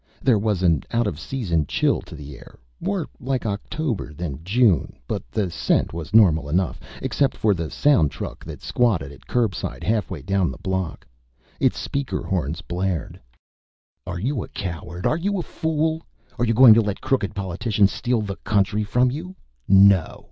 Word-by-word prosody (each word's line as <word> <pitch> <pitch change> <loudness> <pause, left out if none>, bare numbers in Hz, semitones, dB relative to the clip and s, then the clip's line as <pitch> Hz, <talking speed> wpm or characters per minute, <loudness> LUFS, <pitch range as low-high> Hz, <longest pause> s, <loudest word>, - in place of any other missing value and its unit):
There 120 -6 +3
was 100 -3 0
an 85 -5 +3
out 115 0 +1
of 85 -7 -3
season 85 - -1
chill - - +1
to - - -9
the 75 -2 -9
air, - - -15 0.2
more 195 -6 -1
like 130 -1 -2
October 105 - -3
than 80 -3 -5
June; 100 - +2
but - - -2
the 90 - -1
scent - - +1
was 85 -1 -6
normal 85 -9 +5
enough 90 +3 0 0.2
except 140 -2 +1
for 105 -2 +3
the 85 -4 -3
sound 140 - +3
truck - - -7
that - - -9
squatted 95 - +1
at 70 - -16
curbside 115 -8 -1
halfway 100 -9 -1
down 95 0 +1
the - - -7
block. 95 -3 -3 0.5
Its - - +2
speaker 140 -1 -3
horns 85 -2 -2
blared: 90 -3 -3 0.9
"Are 85 -2 -4
you 125 +3 -1
a - - -9
coward? 85 -1 -6
Are 155 - +2
you 200 +4 -1
a - - -2
fool? 160 0 -1 0.4
Are 120 - +2
you 115 -1 +1
going 125 -1 +9
to 115 - +5
let 105 -2 -3
crooked 115 -7 0
politicians 100 +2 +1
steal 120 -2 0
the 100 -2 -4
country 105 +1 +1
from 125 +4 +2
you? 175 +7 -6 0.3
NO! 95 -2 +5
100 Hz, 175 wpm, -23 LUFS, 85-120 Hz, 0.9 s, going